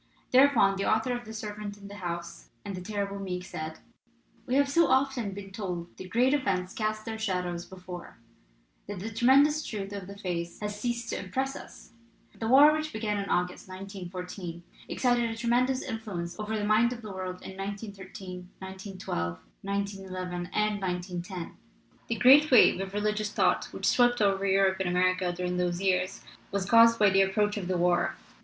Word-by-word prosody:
Thereupon 250 -7 +5
the 195 - +1
author 220 +3 +1
of 240 0 -6
The 220 - -8
Servant 210 -1 -6
in 200 -1 -11
the 205 +1 -9
House 170 -2 -6 0.2
and 200 - -4
The 180 - -6
Terrible 200 0 -3
Meek 180 -2 -4
said: 160 -3 -6 0.7
"We 250 - 0
have 280 0 +4
so 330 +3 +4
often 260 -4 +2
been 195 0 -8
told 180 -4 -5
that 185 - -8
great 250 +6 +3
events 190 -9 0
cast 215 0 -2
their 220 -1 -5
shadows 180 -4 -2
before, 180 -5 -9 0.7
that 205 0 -5
the 210 +5 -5
tremendous 280 +7 +4
truth 205 -5 -5
of 195 -2 -6
the 200 0 -9
phrase 170 -3 -4
has 210 0 -4
ceased 235 -1 -2
to - - -2
impress 265 +9 -2
us. - - -12 0.4
The 225 - -4
war 285 +5 +8
which 310 0 -2
began 215 -2 -2
in 200 - -4
August, 180 +1 -1
1914, 180 -2 -7 0.3
exercised 245 -1 +2
a 230 -1 -1
tremendous 250 +3 +1
influence 200 -6 -5
over 215 +1 -2
the 205 - -1
mind 215 +3 +4
of 235 -1 -10
the 210 - -7
world 185 -1 -6
in 190 - -8
1913, 195 -2 -7
1912, 190 - -5 0.2
1911, 190 -3 -4
and 210 -1 0
1910. 180 -1 -4 0.5
The 230 - -1
great 275 +8 +7
wave 250 -6 +6
of 195 0 -5
religious 210 0 0
thought - - +2
which - - -6
swept 245 0 +4
over 200 -1 +2
Europe 190 0 +3
and 190 -2 0
America 185 0 +2
during 180 0 -3
those 175 -1 0
years 185 -1 0 0.3
was 200 -1 -1
caused 230 0 +7
by 210 -3 +5
the 195 +1 +5
approach 205 +2 +1
of 195 -4 -4
the 185 -1 0
war. 175 0 +2
200 Hz, 180 wpm, -29 LUFS, 185-225 Hz, 0.7 s, war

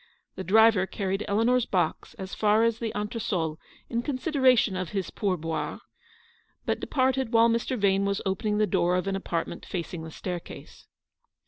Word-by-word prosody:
The 190 - -6
driver 215 -1 +5
carried 195 +1 -2
Eleanor's 230 +4 +2
box 180 -4 -1
as 190 0 -7
far 215 +1 +3
as 230 -1 +1
the 230 -2 -2
entresol 205 -7 -2 0.3
in 235 0 -1
consideration 255 - +2
of 185 -2 -3
his 195 -3 -2
pour 195 -4 -1
boire, 165 0 -3 0.9
but - - 0
departed 260 -3 0
while 230 0 +6
Mr. 235 +2 -1
Yane 200 -1 +2
was 200 0 0
opening 210 +2 0
the 215 - +3
door 180 -3 +1
of 180 - 0
an 195 0 -1
apartment 170 -3 -3
facing 175 -2 -5
the 160 - -7
staircase. 175 +2 -8
200 Hz, 160 wpm, -27 LUFS, 185-230 Hz, 0.9 s, while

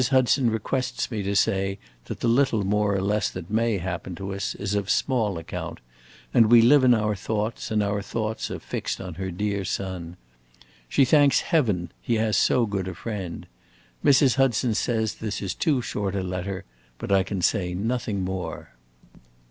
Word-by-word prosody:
Hudson 130 -1 +3
requests 125 +5 -2
me 110 -3 -2
to 100 +1 -2
say 95 0 +1 0.3
that - - -7
the - - +1
little 115 -4 +2
more 105 0 +1
or 95 - 0
less 105 +1 +1
that 85 - -8
may 115 -1 +1
happen 90 0 -4
to 95 +3 -5
us 100 0 -3
is 100 0 -3
of 100 -1 -1
small 110 -8 +1
account, 80 - -6 0.5
as 115 - +7
we 120 +2 +7
live 130 +4 +6
in 125 -1 +6
our 105 -1 0
thoughts 110 +3 -3
and 110 -1 +1
our 100 0 -1
thoughts 110 +2 -3
are - - -4
fixed - - -4
on 90 -2 -6
her 95 +3 -4
dear 100 +2 -2
son. 90 -2 -4 0.7
She 135 - +4
thanks 140 0 +5
Heaven 105 - 0
he 120 - 0
has 110 -1 +1
so 120 +6 +3
good 100 -3 -3
a 95 - -5
friend. 95 -5 -5 0.6
Mrs. 140 -2 +5
Hudson 125 -3 +2
says 110 0 0
that - - -14
this 105 -2 -2
is 100 - -3
too 140 -6 +1
short 100 -3 -3
a 95 - -1
letter, 95 +1 -4 0.3
but - - -6
I 100 -1 +5
can 95 -1 -3
say 90 -4 +1
nothing 105 -1 -2
more. 90 -8 -5
105 Hz, 185 wpm, -25 LUFS, 95-115 Hz, 0.7 s, as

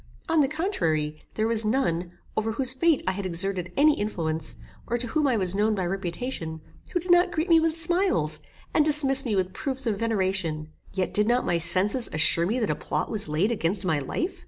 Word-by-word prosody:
On 325 -2 +2
the 275 - +3
contrary, 160 - -2
there 215 - 0
was 225 -1 +4
none, 180 -7 -1 0.2
over 220 +1 -1
whose 260 +2 +1
fate 320 +2 +2
I 185 - +1
had 200 +1 -5
exerted 185 0 -2
any 300 +2 +5
influence, 160 -7 -3 0.3
or 240 - -1
to 245 - -4
whom 295 +5 0
I 250 -4 +1
was 185 -3 +1
known 210 +2 +1
by 190 -3 -2
reputation, 175 -2 -4 0.3
who 355 - -1
did 355 +1 -2
not 350 +1 +4
greet 325 +2 -2
me 330 -1 +6
with 325 0 -1
smiles, 330 - +1 0.3
and 305 - +4
dismiss 280 -3 +6
me 220 -4 -1
with 185 -1 -1
proofs 265 +5 -2
of 210 -4 -1
veneration; 190 -8 -1 0.2
yet 190 -1 -2
did 210 0 +3
not 245 +1 +1
my 170 -1 0
senses 200 +8 +1
assure 160 +2 +4
me 225 +6 -1
that 225 -4 0
a - - -1
plot - - -3
was 210 -5 -2
laid 160 +9 0
against 195 -2 -1
my 160 -4 +1
life? 335 - -4
215 Hz, 210 wpm, -25 LUFS, 175-270 Hz, 0.3 s, me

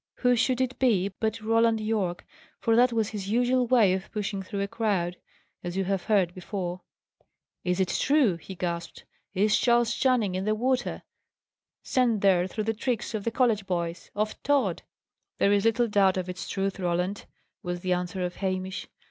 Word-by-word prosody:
Who 250 -1 +4
should 250 +2 +1
it 255 0 -2
be, 205 -7 +3
but 220 0 -1
Roland 225 +1 +3
Yorke? 210 -5 -2 0.3
For 225 - +2
that 245 +1 +5
was 225 -2 0
his 200 -3 -5
usual 245 +2 +2
way 225 -7 +5
of 190 +1 -4
pushing 205 -2 -3
through 200 +1 -4
a 200 - -1
crowd; 195 -5 -1 0.5
as 175 +1 -4
you 195 - +1
have 190 -1 -2
heard 195 -5 +2
before. 185 -1 -5 0.8
"Is 180 +1 0
it 185 -2 +1
true?" 265 - +2
he 190 +3 -10
gasped. 170 -2 -4 0.3
"Is 210 +3 +3
Charles 235 -1 +3
Channing 245 -8 +2
in 185 +1 -2
the 215 0 +1
water! 250 +2 -1 0.8
sent 240 -5 +1
there 185 -2 +4
through 215 +3 -3
the 225 +1 0
tricks 235 +1 -2
of 210 -2 -3
the - - +2
college 225 -5 +1
boys 170 -2 -3
of 215 +1 -2
Tod?" 265 -11 +1 0.6
"There 200 - +3
is 200 +1 +2
little 230 +1 +3
doubt 195 -3 +3
of 185 -1 -2
its 180 +1 -6
truth, 195 0 -2
Roland," 180 +2 -1 0.3
was 175 0 -4
the 185 -1 +1
answer 180 +1 -2
of 180 - -5
Hamish. 185 -1 -3
205 Hz, 180 wpm, -27 LUFS, 185-230 Hz, 0.8 s, that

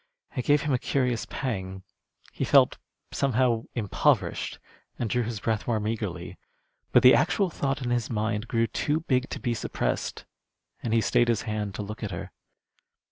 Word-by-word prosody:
It 125 - -2
gave 145 0 +4
him 150 - 0
a 125 - +2
curious 125 -4 0
pang. 95 -7 -4 0.5
He - - -2
felt, - - +5 0.3
somehow, 125 -3 +1
impoverished, 105 -5 +1 0.4
and 120 - -1
drew 125 +3 +1
his 115 -2 -3
breath 110 0 -1
more 115 -3 +1
meagrely. 110 +1 -4 0.5
But - - +5
the 125 - +9
actual 175 +4 +2
thought 135 -3 -2
in 120 - -1
his 120 -2 0
mind 110 0 -1
grew 115 -1 +2
too 150 +6 -1
big 130 -4 0
to - - -5
be 120 - -1
suppressed, 115 - -2 0.6
and 115 - -3
he 115 0 +4
stayed 120 +2 +3
his 115 -2 +1
hand 105 -3 -3
to 105 - -3
look 105 +4 -7
at 105 - -3
her. 85 - -6
115 Hz, 175 wpm, -27 LUFS, 110-130 Hz, 0.6 s, the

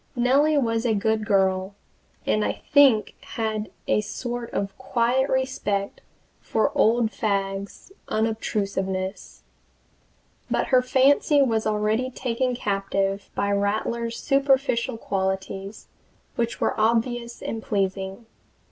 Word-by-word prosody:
Nellie 275 +5 +3
was 230 -4 +1
a 230 -3 +1
good 215 +1 0
girl, 190 0 +1 0.5
and 215 - +1
I - - -3
think 275 -7 +5
had 220 -2 -3 0.2
a - - +2
sort 240 +2 -5
of 195 -1 -3
quiet 255 +1 +1
respect 210 -6 -1 0.4
for 220 - 0
old 225 0 +3
Fagg's 195 - -3 0.2
unobtrusiveness. 195 -3 -2 1.1
But - - 0
her 255 -1 +5
fancy 275 +3 +4
was 225 -4 0
already 215 +4 0
taken 250 0 -1
captive 195 -2 -1
by 200 - 0
Rattler's 220 +3 -1
superficial 270 -3 +1
qualities, 195 0 -3 0.5
which 235 0 -2
were - - +1
obvious 235 +1 0
and 225 - -4
pleasing. 195 +1 -2
220 Hz, 110 wpm, -24 LUFS, 200-245 Hz, 1.1 s, think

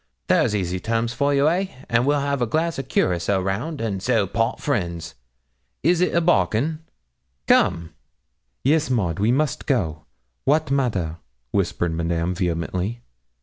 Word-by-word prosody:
There's 105 - +3
easy 95 -2 -1
terms 115 +3 -1
for 140 +1 +1
you, 140 +1 +3
eh, 180 +4 +1 0.2
and 120 +2 +2
we'll 145 0 +3
have 140 -1 -1
a 120 - +2
glass 160 +5 0
o' - - +1
curaçoa 95 -6 0
round, 120 +12 -2
and 100 -4 -2
so 115 -2 +2
part 115 +4 -1
friends. 85 - -2 0.7
Is 170 +3 +3
it 180 - +1
a 170 - +4
bargain? 155 -3 +2 0.7
Come!' 85 +3 +2 0.7
'Yes, 150 +2 +2
Maud, 95 -10 0
we 105 +4 +3
must 145 +3 0
go 85 - 0 0.4
wat 150 0 +2
matter?' 100 - 0 0.3
whispered 85 +6 0
Madame 85 +1 -1
vehemently. 90 +5 -2
115 Hz, 150 wpm, -23 LUFS, 90-140 Hz, 0.7 s, a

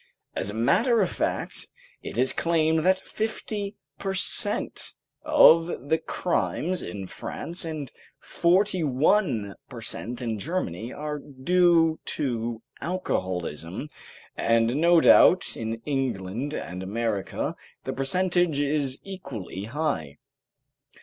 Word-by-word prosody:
As 95 - -1
a 105 - -5
matter 220 - +3
of 185 - +1
fact, - - -2 0.3
it - - -7
is 130 +2 +4
claimed 160 -1 +2
that 185 +4 +3
fifty 215 -1 -4 0.2
per 195 -1 -2
cent. - - 0 0.3
of 170 - +5
the 160 - +3
crimes 180 +1 -1
in 100 -2 -6
France 170 - -6
and 155 -5 -5 0.3
forty 185 +1 +2
one 135 - +2 0.2
per 125 - -8
cent. 120 +2 -4
in 115 -4 -2
Germany 115 - -3
are 150 0 -4
due 165 +4 +3 0.2
to 115 -4 -2 0.2
alcoholism, 95 - -3 0.4
and 115 +1 +2
no 170 +2 +5
doubt 185 - +6
in 115 0 -3
England 130 -1 -2
and 90 +1 -5
America 105 +1 -2 0.3
the - - -3
percentage 175 +2 +1
is 140 -2 0
equally 135 - -7
high. 115 - -2
145 Hz, 115 wpm, -26 LUFS, 115-175 Hz, 0.4 s, doubt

